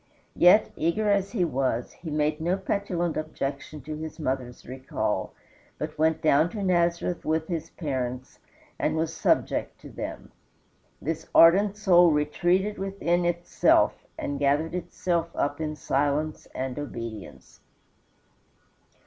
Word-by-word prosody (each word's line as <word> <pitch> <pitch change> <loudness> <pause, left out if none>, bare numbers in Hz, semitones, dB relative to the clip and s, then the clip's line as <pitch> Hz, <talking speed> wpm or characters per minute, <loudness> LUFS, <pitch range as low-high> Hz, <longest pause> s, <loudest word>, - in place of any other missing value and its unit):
Yet, 180 +5 +6
eager 205 +6 +1
as 200 -1 +1
he 185 -7 +2
was, 130 -5 -1
he 165 - -9
made 150 +1 0
no 175 +4 +1
petulant 185 -4 -2
objection 150 -1 -4
to 155 +1 -5
his 155 +1 -7
mother's 130 -4 -3
recall, 130 +1 -3 0.5
but 155 0 -5
went 160 +1 +1
down 155 +2 +4
to 205 - -3
Nazareth 175 -1 +1
with 160 0 0
his 165 -4 -4
parents 130 -5 -4 0.4
and - - 0
was 160 0 -1
subject - - 0
to - - -11
them. - - -7 0.7
This 160 +1 -4
ardent 195 +5 +6
soul 180 -4 +6
retreated 175 +7 +1
within 190 -3 0
itself, 175 0 +3 0.2
and 140 -1 -3
gathered 145 +4 +1
itself 175 -1 -2
up 145 +2 -1
in 155 -1 -3
silence 145 +2 -1
and 130 +1 -3
obedience. 115 -7 -8
160 Hz, 130 wpm, -26 LUFS, 145-175 Hz, 0.7 s, Yet